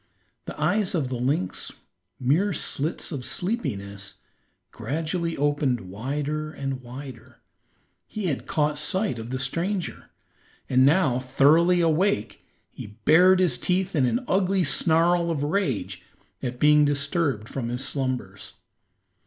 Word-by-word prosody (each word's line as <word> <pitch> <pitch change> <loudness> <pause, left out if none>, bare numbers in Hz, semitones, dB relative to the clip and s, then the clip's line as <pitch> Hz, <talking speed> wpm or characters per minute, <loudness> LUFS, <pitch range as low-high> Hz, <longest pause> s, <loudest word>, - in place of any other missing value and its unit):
The - - -8
eyes 205 -3 +1
of 145 -7 -1
the 130 - -3
lynx, 125 -7 -2 0.5
mere 160 +10 +2
slits 155 +2 -1
of 140 -5 -4
sleepiness, 100 - -3 0.6
gradually 165 +3 -3
opened 145 -3 +1
wider 145 +10 -4
and 135 -3 -4
wider. 125 -1 -10 0.7
He 215 -2 -5
had 155 -7 -2
caught 150 -1 0
sight 185 - 0
of 115 +1 -7
the 130 - -2
stranger, 170 +8 -3 0.6
and 130 0 +4
now 145 -6 +3
thoroughly 160 +7 +4
awake 165 - 0 0.3
he 105 +1 -10
bared 180 +4 +6
his 185 -2 +2
teeth 185 +1 0
in 135 -4 +3
an 245 - -1
ugly 190 0 +2
snarl 170 +1 +3
of 150 -4 -1
rage 150 - -1 0.4
at 125 -1 -4
being 150 0 +5
disturbed 145 -4 0
from 120 -2 -4
his 125 +2 -1
slumbers. 125 -8 -4
150 Hz, 130 wpm, -25 LUFS, 130-175 Hz, 0.7 s, bared